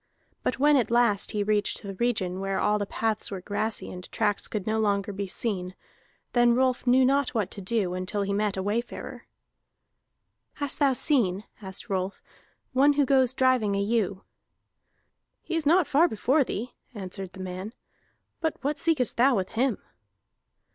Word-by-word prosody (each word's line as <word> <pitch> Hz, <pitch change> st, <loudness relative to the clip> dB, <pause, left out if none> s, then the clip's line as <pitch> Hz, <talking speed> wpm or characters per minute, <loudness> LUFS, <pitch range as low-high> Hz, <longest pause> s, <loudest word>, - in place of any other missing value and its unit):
But -, -, -1 dB
when 290 Hz, +2 st, +5 dB
at 245 Hz, -, +1 dB
last 235 Hz, -4 st, +2 dB
he 210 Hz, -2 st, -1 dB
reached 210 Hz, +1 st, 0 dB
the 200 Hz, -1 st, -5 dB
region 190 Hz, -4 st, -1 dB
where 195 Hz, 0 st, -1 dB
all 210 Hz, 0 st, +2 dB
the 205 Hz, -, -2 dB
paths 220 Hz, 0 st, -1 dB
were 195 Hz, -, -5 dB
grassy 210 Hz, +3 st, -3 dB
and 180 Hz, 0 st, -9 dB
tracks 210 Hz, -2 st, 0 dB
could 210 Hz, -3 st, -4 dB
no 220 Hz, 0 st, 0 dB
longer 205 Hz, -1 st, 0 dB
be 200 Hz, 0 st, -4 dB
seen, 185 Hz, -3 st, -2 dB, 0.6 s
then 240 Hz, -1 st, +4 dB
Rolf 255 Hz, 0 st, +1 dB
knew 255 Hz, +1 st, +5 dB
not 275 Hz, -1 st, +1 dB
what 215 Hz, -5 st, 0 dB
to 200 Hz, -, -7 dB
do 195 Hz, -2 st, 0 dB
until 185 Hz, +3 st, -2 dB
he 200 Hz, 0 st, -2 dB
met 205 Hz, -1 st, 0 dB
a 190 Hz, -, -1 dB
wayfarer. 225 Hz, +4 st, -4 dB, 1.3 s
"Hast 285 Hz, -2 st, -4 dB
thou 280 Hz, -2 st, +4 dB
seen," 215 Hz, -, +1 dB, 0.2 s
asked 190 Hz, -2 st, -7 dB
Rolf, 190 Hz, 0 st, -2 dB, 0.5 s
"one 280 Hz, +3 st, +5 dB
who 285 Hz, -1 st, +2 dB
goes 260 Hz, -1 st, +3 dB
driving 255 Hz, -6 st, +2 dB
a -, -, 0 dB
ewe?" 200 Hz, -2 st, 0 dB, 1.2 s
"He 335 Hz, -, -3 dB
is 320 Hz, -3 st, 0 dB
not 350 Hz, +3 st, +5 dB
far 300 Hz, +4 st, +4 dB
before 270 Hz, +4 st, +2 dB
thee," 245 Hz, 0 st, -5 dB, 0.2 s
answered 190 Hz, -1 st, -6 dB
the -, -, -11 dB
man. 185 Hz, +3 st, -5 dB, 0.7 s
"But 320 Hz, -2 st, -1 dB
what 285 Hz, +1 st, -1 dB
seekest 300 Hz, -7 st, +2 dB
thou 255 Hz, +2 st, +5 dB
with 190 Hz, -3 st, -1 dB
him?" 245 Hz, -1 st, 0 dB
220 Hz, 170 wpm, -27 LUFS, 195-260 Hz, 1.3 s, when